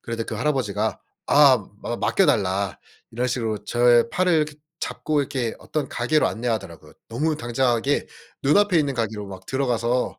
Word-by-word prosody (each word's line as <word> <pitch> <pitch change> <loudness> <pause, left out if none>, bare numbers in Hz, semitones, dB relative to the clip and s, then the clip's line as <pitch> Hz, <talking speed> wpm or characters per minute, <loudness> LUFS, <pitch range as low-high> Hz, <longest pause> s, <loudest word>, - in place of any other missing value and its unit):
그런데 115 -1 -4
그 110 - -5
할아버지가 110 -4 -1 0.3
아 140 -3 +6 0.2
맡 120 - -4
맡겨달라 100 - +1 0.3
이런 120 +3 -1
식으로 115 -4 -2
저의 120 -1 +4
팔을 185 0 +1
이렇게 155 -2 +1 0.3
잡고 150 -1 -1
이렇게 130 -4 -2
어떤 150 -3 -3
가게로 135 +6 +1
안내하더라고요. 110 -7 -4 0.2
너무 150 +7 -1
당당하게 125 0 0 0.4
눈앞에 180 +6 +4
있는 145 -3 0
가게로 110 -3 -3
막 95 -1 -10
들어가서 125 -2 -1
120 Hz, 370 characters per minute, -23 LUFS, 115-145 Hz, 0.4 s, 아